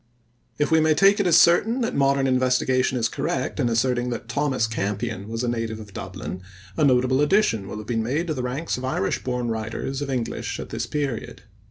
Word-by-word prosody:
If 150 - 0
we 160 - +5
may 155 0 +3
take 195 +4 +5
it 200 - +2
as 170 - +6
certain 225 +9 +4
that 230 - -1
modern 140 0 +2
investigation 130 0 +2
is 115 -2 +1
correct 130 +5 -3
in 125 -4 +2
asserting 120 +1 +1
that 120 -1 -5
Thomas 130 -1 0
Campion 105 -1 -3
was 115 +2 -3
a - - 0
native 115 -2 -2
of 105 -2 -11
Dublin, 95 -1 -6 0.3
a - - +1
notable 130 0 +3
addition 150 - +2
will 105 - -6
have 105 - -7
been 115 0 -1
made 140 +9 -1
to 160 - -2
the 130 - -3
ranks 130 +6 -2
of 125 - -7
Irish 130 -7 -1
born 125 -2 -2
writers 115 +5 -3
of 145 - -3
English 125 -4 -3
at - - -7
this 115 +1 -3
period. 140 -4 -4
125 Hz, 210 wpm, -24 LUFS, 115-145 Hz, 0.3 s, as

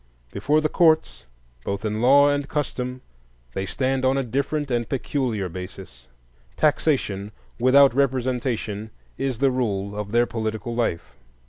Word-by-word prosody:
Before 150 +2 +1
the 155 - +2
courts, 160 - +2 0.4
both 100 +2 -3
in 110 +1 -2
law 140 +3 +6
and 145 0 0
custom, 130 -4 -3 0.5
they 95 +7 -3
stand 130 +7 -1
on 130 +1 +3
a 135 - +1
different 140 +3 -2
and 120 -2 -1
peculiar 125 -6 -1
basis. 90 -8 -9 0.5
Taxation 130 -10 +1 0.3
without 130 +2 +6
representation 125 -5 -1 0.3
is 135 -3 -1
the 135 +2 +3
rule 100 -5 -2
of 105 -1 -5
their 120 +1 +4
political 110 +1 -4
life. 85 - -2
125 Hz, 135 wpm, -23 LUFS, 105-135 Hz, 0.5 s, law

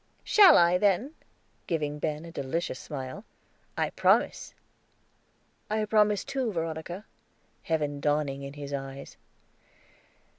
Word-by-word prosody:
"Shall 390 -7 +7
I, 175 +1 +4
then?" 210 - +1 0.5
giving 150 -3 -2
Ben 155 +1 -3
a 165 - -9
delicious 140 -1 -3
smile. 135 +7 -7 0.5
"I - - 0
promise." - - +1 1.1
"I 215 0 0
promise, 210 -1 +3
too, 270 -4 -2
Veronica," 165 +3 -4 0.6
heaven 150 -3 -1
dawning 145 -1 0
in 140 0 -7
his 145 -1 -7
eyes. 135 0 -6
160 Hz, 110 wpm, -28 LUFS, 145-205 Hz, 1.1 s, Shall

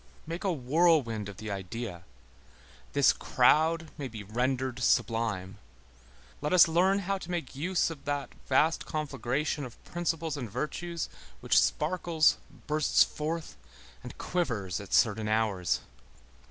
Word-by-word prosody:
Make 165 +5 -5
a 195 - +1
whirlwind 135 - +2
of 100 - -10
the 110 0 -6
idea. 95 -1 -5 0.9
This - - +5
crowd 160 +1 +2
may 140 - -3
be 110 -4 -8
rendered 125 +4 -1
sublime. 110 -6 0 0.8
Let 150 +4 -1
us 180 -2 +8
learn 180 +4 +3
how 195 +1 -1
to 180 - -9
make 170 -7 -3
use 170 +4 0
of 140 -4 -10
that 145 -1 -3
vast 155 +5 +2
conflagration 145 -1 -2
of 125 -3 -9
principles 165 -3 -2
and 120 -5 -5
virtues, 160 - -3 0.3
which - - 0
sparkles, 165 -1 +2 0.3
bursts 150 -1 +4
forth 160 +2 -4 0.5
and - - -10
quivers 115 - -2
at 100 - -11
certain 110 -1 +3
hours. 105 -5 +1
145 Hz, 130 wpm, -29 LUFS, 115-165 Hz, 0.9 s, us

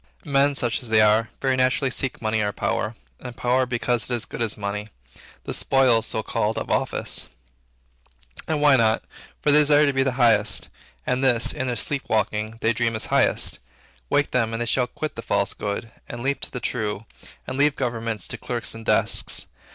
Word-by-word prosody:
Men 140 0 +2
such 120 0 -1
as 120 - -9
they 110 0 +4
are, 110 +1 +4
very 130 -1 +2
naturally 130 +1 +1
seek 130 -1 -2
money 110 0 +1
or 105 -1 0
power; 105 +2 -2 0.2
and 125 -2 -9
power 125 +1 +1
because 120 -1 -1
it 125 - -4
is 120 - -1
as - - -4
good - - -7
as 110 -2 -1
money, 105 0 -4 0.6
the - - -5
"spoils," 130 -4 +3
so - - -2
called, - - -1
"of - - -4
office." - - -1 1.2
And 155 -2 -1
why 145 -3 +6
not? 110 -2 +2 0.4
for 150 - +4
they 150 +1 +6
aspire 145 0 +4
to 135 0 +2
the 135 -1 0
highest, 110 -4 +3 0.4
and 130 +1 0
this, 120 -3 +3
in 130 -3 -3
their 125 - -1
sleep 135 +4 -1
walking, 110 0 -1
they 115 - +2
dream 115 0 0
is 110 - -1
highest. - - +3 0.5
Wake 145 - +1
them, 115 -3 0
and 115 - -3
they - - -4
shall 125 +1 +1
quit 155 +3 -5
the - - -5
false - - 0
good, 105 +2 -4 0.2
and 120 0 -6
leap 140 +1 -1
to - - -3
the 125 - -4
true, 110 -3 -3 0.4
and 130 - -5
leave 145 +1 +3
governments 115 -4 -3
to - - -6
clerks 120 -2 -3
and 115 0 -9
desks. - - +2
120 Hz, 200 wpm, -23 LUFS, 110-135 Hz, 1.2 s, why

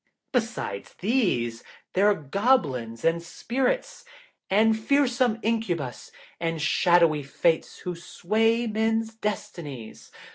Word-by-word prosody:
Besides 225 - -3
these, 180 - 0 0.3
there 195 +2 +4
are 205 - +3
Goblins 145 - 0
and 165 +1 +2
Spirits, 265 - -2 0.5
and 220 +3 +4
fearsome 245 0 +2
Incubas, 180 - -2 0.3
and 165 -1 -2
shadowy 170 -1 +3
Fates 160 +4 0
who 180 -1 -3
sway 225 +7 0
men's 225 0 0
destinies. 170 - -6
200 Hz, 100 wpm, -26 LUFS, 160-225 Hz, 0.5 s, there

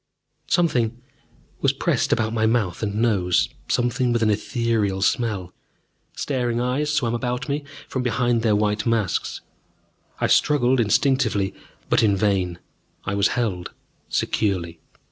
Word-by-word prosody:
Something 120 -9 +1 0.6
was - - +2
pressed - - 0
about 110 -1 +1
my 110 -1 +2
mouth 110 -7 0
and 105 -2 -2
nose, 95 -6 +2 0.2
something 125 +1 +1
with 120 -1 +1
an 110 - +3
ethereal 105 -3 0
smell. 100 -5 0 0.6
Staring 125 -4 -1
eyes 130 +5 0
swam 125 -6 0
about 125 +3 -2
me 145 0 -2 0.2
from 130 - -2
behind 120 -1 +1
their 110 -2 +3
white 105 +1 0
masks. 115 -5 0 0.8
I - - +1
struggled 130 -3 +3
instinctively, 115 -3 +2 0.3
but - - +3
in 105 -3 +3
vain 95 -4 +1 0.5
I 95 - -2
was 100 0 +3
held 100 -7 -2 0.4
securely. 85 -5 -1
115 Hz, 130 wpm, -23 LUFS, 100-125 Hz, 0.8 s, an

